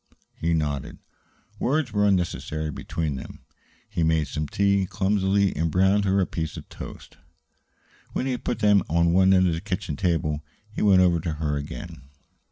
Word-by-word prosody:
He 85 Hz, 0 st, 0 dB
nodded. 75 Hz, -4 st, -2 dB, 0.6 s
Words 140 Hz, -3 st, 0 dB
were 105 Hz, 0 st, +3 dB
unnecessary 80 Hz, -5 st, -1 dB
between 75 Hz, 0 st, -3 dB
them. -, -, -9 dB, 0.5 s
He 85 Hz, -, -3 dB
made 80 Hz, -2 st, +2 dB
some 75 Hz, -1 st, -3 dB
tea 100 Hz, +2 st, +1 dB
clumsily 100 Hz, 0 st, +1 dB
and 80 Hz, +2 st, 0 dB
browned 95 Hz, +4 st, +3 dB
her 95 Hz, 0 st, +2 dB
a 95 Hz, -, +3 dB
piece 80 Hz, -3 st, -4 dB
of -, -, -9 dB
toast. -, -, -10 dB, 1.0 s
When -, -, -1 dB
he 135 Hz, -, 0 dB
had 125 Hz, -, -4 dB
put 120 Hz, -, -1 dB
them 105 Hz, -3 st, +4 dB
on 85 Hz, +1 st, +3 dB
one 95 Hz, +1 st, +5 dB
end 95 Hz, -1 st, +5 dB
of 85 Hz, -, +1 dB
the 80 Hz, -, -3 dB
kitchen 90 Hz, -6 st, -3 dB
table, 75 Hz, -3 st, 0 dB, 0.3 s
he -, -, -4 dB
went 95 Hz, -3 st, +6 dB
over 85 Hz, -2 st, +3 dB
to 80 Hz, 0 st, -3 dB
her 75 Hz, -1 st, -2 dB
again. 80 Hz, +3 st, -7 dB
90 Hz, 175 wpm, -25 LUFS, 80-100 Hz, 1.0 s, went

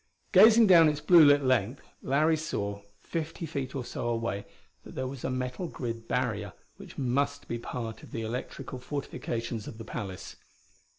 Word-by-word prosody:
Gazing 225 Hz, +1 st, +8 dB
down 170 Hz, -5 st, +7 dB
its 150 Hz, -1 st, -2 dB
blue 170 Hz, 0 st, +7 dB
lit 145 Hz, -1 st, +6 dB
length 130 Hz, -1 st, +1 dB, 0.2 s
Larry 155 Hz, +4 st, +2 dB
saw, 100 Hz, -10 st, -3 dB, 0.2 s
fifty 165 Hz, 0 st, -4 dB
feet 140 Hz, -4 st, -4 dB
or 130 Hz, -3 st, -3 dB
so 120 Hz, -, -4 dB
away, 115 Hz, -4 st, -2 dB, 0.4 s
that -, -, -12 dB
there 130 Hz, -, -2 dB
was 130 Hz, -1 st, -7 dB
a -, -, -1 dB
metal 130 Hz, +6 st, -3 dB
grid 115 Hz, -7 st, -6 dB
barrier 110 Hz, -6 st, -1 dB, 0.2 s
which -, -, -12 dB
must 140 Hz, +2 st, -1 dB
be 120 Hz, -, -3 dB
part 115 Hz, -1 st, -6 dB
of -, -, -13 dB
the 115 Hz, -, -4 dB
electrical 125 Hz, +2 st, -5 dB
fortifications 120 Hz, -4 st, -4 dB
of 110 Hz, -, -8 dB
the 115 Hz, -, -8 dB
palace. 100 Hz, -4 st, -7 dB
130 Hz, 170 wpm, -29 LUFS, 115-145 Hz, 0.4 s, Gazing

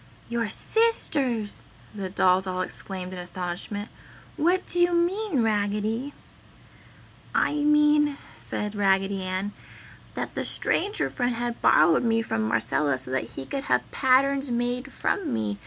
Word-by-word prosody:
"Your 235 Hz, -2 st, -1 dB
SISTERS!" 270 Hz, -, 0 dB, 0.3 s
the 195 Hz, -3 st, -5 dB
dolls 185 Hz, 0 st, +3 dB
all 185 Hz, 0 st, -1 dB
exclaimed 185 Hz, 0 st, -4 dB
in 180 Hz, -, -6 dB
astonishment, 180 Hz, +3 st, -4 dB, 0.5 s
"What 350 Hz, +4 st, +2 dB
do 355 Hz, -, 0 dB
you 350 Hz, 0 st, +4 dB
mean, 350 Hz, -, +1 dB
Raggedy?" 215 Hz, +5 st, -1 dB, 1.2 s
"I -, -, +2 dB
mean," 295 Hz, -1 st, +3 dB, 0.2 s
said 210 Hz, 0 st, -3 dB
Raggedy 195 Hz, -1 st, +1 dB
Ann, 185 Hz, +2 st, -3 dB, 0.6 s
"that -, -, -4 dB
the -, -, -2 dB
Stranger 410 Hz, +2 st, 0 dB
Friend 245 Hz, -1 st, -1 dB
had 240 Hz, 0 st, -3 dB
borrowed 160 Hz, +1 st, +5 dB
me 225 Hz, -1 st, +2 dB
from 110 Hz, -, -2 dB
Marcella 130 Hz, +5 st, +1 dB
so 130 Hz, 0 st, -1 dB
that 130 Hz, -3 st, 0 dB
he 135 Hz, -, -5 dB
could 275 Hz, -, -4 dB
have -, -, 0 dB
patterns 270 Hz, +1 st, +3 dB
made 245 Hz, +3 st, -2 dB
from 390 Hz, -5 st, -1 dB
me. 105 Hz, -2 st, -2 dB
225 Hz, 140 wpm, -26 LUFS, 185-280 Hz, 1.2 s, borrowed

